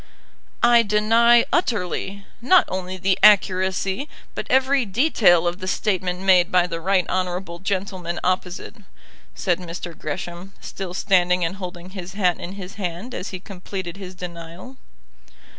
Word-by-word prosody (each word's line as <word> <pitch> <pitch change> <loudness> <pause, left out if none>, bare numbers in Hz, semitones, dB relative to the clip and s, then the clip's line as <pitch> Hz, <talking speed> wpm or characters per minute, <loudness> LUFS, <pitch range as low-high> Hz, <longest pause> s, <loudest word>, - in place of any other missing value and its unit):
"I 240 0 +7
deny 230 +3 +4
utterly, 200 - -1 0.2
not 355 +9 +5
only 185 0 -4
the 190 +1 +1
accuracy, 190 +3 +3 0.2
but - - -5
every 265 +1 +3
detail 200 - +3
of 175 +2 -2
the 185 - -6
statement 185 -2 -1
made 185 -1 +4
by 180 -1 +4
the 165 -2 -5
right 185 0 +1
honourable 180 -1 -3
gentleman 185 -2 -3
opposite," 180 0 -2 0.6
said 175 - 0
Mr. 170 -1 -7
Gresham, 175 +4 -6
still 185 -2 -7
standing 180 -3 +2
and 180 +4 -4
holding 180 -1 -8
his 190 -1 -8
hat 185 -4 +1
in 180 - -6
his 195 -1 -8
hand 180 +7 -4
as 185 - -5
he 185 - -6
completed 185 -2 -7
his 185 -2 -9
denial. 175 +7 -9
185 Hz, 140 wpm, -22 LUFS, 180-200 Hz, 0.6 s, I